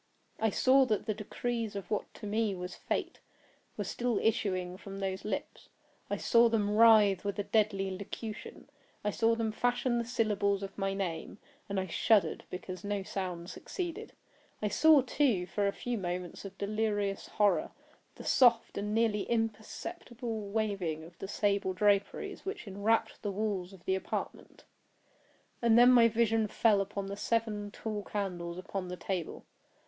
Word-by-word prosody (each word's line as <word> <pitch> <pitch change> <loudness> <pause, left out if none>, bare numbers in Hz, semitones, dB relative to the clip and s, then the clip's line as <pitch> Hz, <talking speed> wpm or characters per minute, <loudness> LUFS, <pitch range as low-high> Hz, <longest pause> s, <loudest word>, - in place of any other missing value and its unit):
I 220 - +3
saw 265 +5 +5
that 215 -4 0
the 215 - 0
decrees 225 +1 -3
of 200 +1 -6
what 210 - -1
to 210 - -9
me 210 -1 0
was 180 0 -6
Fate, - - -3 0.6
were - - -1
still 240 -3 -1
issuing 185 -5 0
from 195 +1 -9
those 190 -1 -3
lips. 215 - -5 0.4
I - - -1
saw 235 -1 +5
them 210 -3 +1
writhe 215 -4 +6
with 200 -1 -2
a 205 - -1
deadly 195 -3 +1
locution. 210 +3 -7 0.4
I 210 - +1
saw 230 +2 +2
them 225 -1 -1
fashion 245 +1 +1
the - - 0
syllables 210 -4 0
of 195 0 -6
my 195 -1 -1
name; 175 -4 -4 0.3
and 200 -1 0
I 190 - -1
shuddered 190 -1 +2
because 180 0 -7
no 205 -1 -2
sound 180 -2 -4
succeeded. 350 -3 -5 0.5
I 210 - -1
saw, 305 +5 +6
too, 245 -8 +1
for 200 +3 0
a - - +2
few 240 +2 -3
moments 180 0 -4
of 195 0 -9
delirious 205 -1 -1
horror, 205 -1 +2 0.5
the - - -10
soft 235 -5 +4
and 210 +1 -2
nearly 225 -3 +1
imperceptible 225 - -3
waving 200 -7 -1
of 170 +1 -14
the 195 - -5
sable 200 -2 0
draperies 200 +1 +1
which 395 - -5
enwrapped 205 +3 0
the 205 - -2
walls 200 -3 -2
of 190 -3 -15
the 190 - +1
apartment. 190 - -4 1.0
And 230 -1 +5
then 245 +1 +8
my 240 -2 +7
vision 225 -1 +2
fell 210 -1 +3
upon 200 0 -4
the 200 0 -5
seven 210 -1 -1
tall 210 0 -4
candles 180 -5 -4
upon 185 0 -4
the 180 0 -5
table. 175 -2 -4
205 Hz, 165 wpm, -31 LUFS, 195-225 Hz, 1.0 s, then